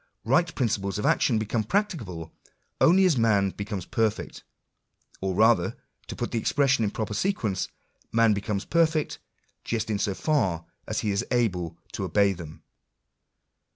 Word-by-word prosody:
Bight 160 Hz, +8 st, +2 dB
principles 105 Hz, -6 st, -1 dB
of 105 Hz, -, -2 dB
action 115 Hz, -, +3 dB
become 110 Hz, +1 st, -1 dB
practicable, 110 Hz, -, -2 dB, 0.5 s
only 190 Hz, +3 st, +6 dB
as 160 Hz, -9 st, +3 dB
man 100 Hz, -4 st, +3 dB
becomes 100 Hz, -2 st, -5 dB
perfect; 110 Hz, -2 st, -2 dB, 0.8 s
or 95 Hz, -1 st, -1 dB
rather, 110 Hz, -3 st, +3 dB, 0.3 s
to -, -, -6 dB
put -, -, -3 dB
the 115 Hz, -, 0 dB
expressions 135 Hz, 0 st, +2 dB
in -, -, +1 dB
proper 105 Hz, 0 st, -4 dB
sequence 110 Hz, -, -1 dB, 0.2 s
— -, -, -38 dB
man 115 Hz, -1 st, +4 dB
becomes 100 Hz, 0 st, -2 dB
perfect, 160 Hz, -2 st, +1 dB, 0.4 s
just 110 Hz, -1 st, -2 dB
in 105 Hz, -, 0 dB
so 100 Hz, -1 st, 0 dB
far 95 Hz, -, 0 dB, 0.2 s
as 110 Hz, -, -1 dB
he 105 Hz, -, 0 dB
is 100 Hz, +3 st, 0 dB
able 90 Hz, -9 st, 0 dB
to -, -, -4 dB
obey 100 Hz, +1 st, +3 dB
them. 80 Hz, -4 st, -10 dB
110 Hz, 155 wpm, -26 LUFS, 100-120 Hz, 0.8 s, only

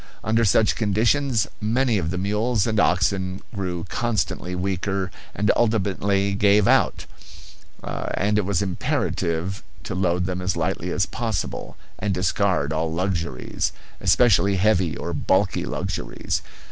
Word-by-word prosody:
Under 110 Hz, +1 st, +2 dB
such 105 Hz, +1 st, +3 dB
conditions 115 Hz, +3 st, +2 dB, 0.2 s
many 115 Hz, +1 st, +2 dB
of 80 Hz, -3 st, -2 dB
the 90 Hz, -, -2 dB
mules 105 Hz, +3 st, +1 dB
and 110 Hz, -2 st, 0 dB
oxen 95 Hz, 0 st, +1 dB
grew 90 Hz, -4 st, -3 dB
constantly 95 Hz, -5 st, -2 dB
weaker 95 Hz, 0 st, -2 dB, 0.2 s
and 105 Hz, +1 st, +2 dB
ultimately 100 Hz, -3 st, +1 dB
gave 100 Hz, 0 st, +4 dB
out; -, -, +3 dB, 0.8 s
and 105 Hz, +2 st, -1 dB
it -, -, +1 dB
was 100 Hz, 0 st, 0 dB
imperative 90 Hz, 0 st, -1 dB, 0.2 s
to -, -, -4 dB
load 90 Hz, -1 st, +1 dB
them 90 Hz, 0 st, -3 dB
as 90 Hz, 0 st, -1 dB
lightly -, -, -1 dB
as -, -, +1 dB
possible, -, -, -4 dB, 0.2 s
and 100 Hz, -3 st, -1 dB
discard 90 Hz, -5 st, +1 dB
all 80 Hz, +1 st, -1 dB
luxuries, 85 Hz, -6 st, -2 dB, 0.3 s
especially 100 Hz, -4 st, +4 dB
heavy 95 Hz, -4 st, +2 dB
or 85 Hz, -, -4 dB
bulky 95 Hz, +4 st, +1 dB
luxuries. -, -, -3 dB
95 Hz, 130 wpm, -23 LUFS, 90-105 Hz, 0.8 s, gave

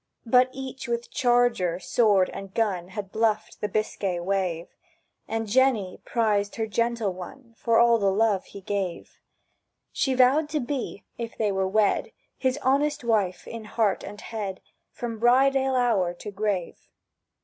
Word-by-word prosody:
But 250 Hz, +2 st, +5 dB
each 265 Hz, 0 st, -7 dB
with 235 Hz, 0 st, -3 dB
charger, 240 Hz, -9 st, +2 dB
sword, 200 Hz, -2 st, +3 dB
and 195 Hz, -1 st, -8 dB
gun, 195 Hz, -6 st, 0 dB
Had 195 Hz, 0 st, -7 dB
bluffed 220 Hz, -1 st, 0 dB
the 210 Hz, -, -1 dB
Biscay 195 Hz, -3 st, -1 dB
wave; 180 Hz, -2 st, -1 dB, 0.6 s
And 225 Hz, 0 st, -2 dB
Jenny 220 Hz, -4 st, +1 dB
prized 210 Hz, -3 st, 0 dB
her 225 Hz, -, -1 dB
gentle 230 Hz, -1 st, 0 dB
one 230 Hz, +7 st, -10 dB
For 230 Hz, 0 st, +1 dB
all 235 Hz, -1 st, +5 dB
the 200 Hz, -1 st, +2 dB
love 205 Hz, -1 st, +1 dB
he 200 Hz, -, -11 dB
gave. 190 Hz, -3 st, -4 dB, 0.7 s
She 265 Hz, -2 st, 0 dB
vowed 270 Hz, +5 st, +4 dB
to 305 Hz, 0 st, -1 dB
be, 250 Hz, -5 st, -4 dB, 0.2 s
if 230 Hz, -1 st, -5 dB
they 215 Hz, -2 st, +1 dB
were 190 Hz, -1 st, 0 dB
wed, 205 Hz, +1 st, +1 dB, 0.2 s
His 260 Hz, 0 st, 0 dB
honest 290 Hz, +2 st, +1 dB
wife 210 Hz, -6 st, 0 dB
in 230 Hz, -2 st, -7 dB
heart 210 Hz, -1 st, 0 dB
and 205 Hz, +1 st, -8 dB
head 205 Hz, -4 st, -5 dB, 0.3 s
From 230 Hz, -2 st, -5 dB
bride 260 Hz, +4 st, +4 dB
ale 265 Hz, 0 st, +1 dB
hour 200 Hz, -8 st, +2 dB
to 205 Hz, +4 st, -8 dB
grave. 200 Hz, -3 st, -3 dB
220 Hz, 155 wpm, -26 LUFS, 195-245 Hz, 0.7 s, But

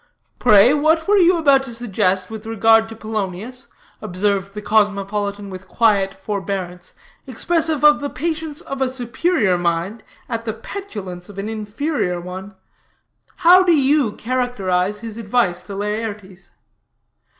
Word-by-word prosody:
"Pray, 220 Hz, +1 st, +6 dB
what 315 Hz, +2 st, +2 dB
were 415 Hz, +1 st, +4 dB
you 355 Hz, 0 st, +5 dB
about 280 Hz, -4 st, +4 dB
to 250 Hz, -4 st, -6 dB
suggest 195 Hz, -4 st, 0 dB
with 220 Hz, 0 st, -8 dB
regard 225 Hz, 0 st, +3 dB
to 225 Hz, -, -9 dB
Polonius," 220 Hz, +3 st, -5 dB, 0.3 s
observed 195 Hz, +1 st, -1 dB
the -, -, -4 dB
cosmopolitan 205 Hz, -1 st, 0 dB
with 185 Hz, 0 st, -9 dB
quiet 200 Hz, -3 st, +2 dB
forbearance, 190 Hz, -3 st, -5 dB, 0.3 s
expressive 320 Hz, +3 st, 0 dB
of 300 Hz, 0 st, +6 dB
the 285 Hz, -, -3 dB
patience 315 Hz, +2 st, -4 dB
of 275 Hz, 0 st, -6 dB
a 265 Hz, -, +2 dB
superior 250 Hz, -, 0 dB
mind 175 Hz, +5 st, -1 dB, 0.3 s
at 230 Hz, -1 st, -4 dB
the 220 Hz, -1 st, -3 dB
petulance 210 Hz, -, -8 dB
of 200 Hz, -, -12 dB
an 200 Hz, +1 st, -4 dB
inferior 215 Hz, -, -2 dB
one; 185 Hz, +3 st, -8 dB, 0.9 s
"how 360 Hz, +2 st, +8 dB
do 345 Hz, -5 st, +4 dB
you 275 Hz, -4 st, +2 dB
characterize 210 Hz, -6 st, -1 dB
his 225 Hz, -1 st, -7 dB
advice 205 Hz, -5 st, 0 dB
to 195 Hz, +2 st, -9 dB
Laertes?" 205 Hz, -3 st, -5 dB
220 Hz, 140 wpm, -20 LUFS, 195-265 Hz, 0.9 s, how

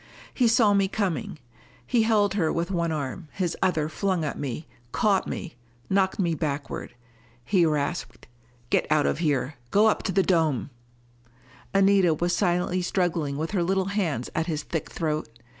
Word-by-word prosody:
He 245 Hz, -, +3 dB
saw 225 Hz, -3 st, +4 dB
me 195 Hz, -1 st, +3 dB
coming. 200 Hz, -1 st, -2 dB, 0.5 s
He 240 Hz, -2 st, +2 dB
held 215 Hz, -3 st, +3 dB
her 175 Hz, -6 st, +1 dB
with 170 Hz, +3 st, -2 dB
one 170 Hz, -3 st, 0 dB
arm! 155 Hz, +2 st, -4 dB
his 180 Hz, -3 st, -1 dB
other 160 Hz, -5 st, +1 dB
flung 180 Hz, +1 st, -1 dB
at 145 Hz, -, -3 dB
me, 140 Hz, +2 st, -4 dB, 0.3 s
caught 205 Hz, -4 st, +2 dB
me, 180 Hz, -5 st, -5 dB, 0.4 s
knocked 190 Hz, -1 st, +2 dB
me 175 Hz, -4 st, +1 dB
backward. 145 Hz, -5 st, -4 dB, 0.5 s
He 175 Hz, +1 st, +3 dB
rasped: 150 Hz, -4 st, -2 dB, 0.5 s
"Get -, -, +1 dB
out 155 Hz, -1 st, +4 dB
of -, -, 0 dB
here! 145 Hz, -3 st, 0 dB
Go 205 Hz, -, +4 dB
up 220 Hz, -, +3 dB
to 190 Hz, -, -2 dB
the 190 Hz, +1 st, +3 dB
dome 160 Hz, -8 st, +1 dB, 0.5 s
" 120 Hz, +2 st, -28 dB
Anita 195 Hz, -4 st, +4 dB
was 175 Hz, +3 st, 0 dB
silently 180 Hz, -1 st, +1 dB
struggling 170 Hz, -6 st, -1 dB
with 160 Hz, +2 st, -3 dB
her 195 Hz, -4 st, +1 dB
little 190 Hz, +2 st, +1 dB
hands 165 Hz, -, -1 dB
at 160 Hz, -, -1 dB
his 155 Hz, -3 st, -2 dB
thick 160 Hz, -, -4 dB
throat. 155 Hz, -5 st, -2 dB
175 Hz, 170 wpm, -26 LUFS, 155-195 Hz, 0.5 s, saw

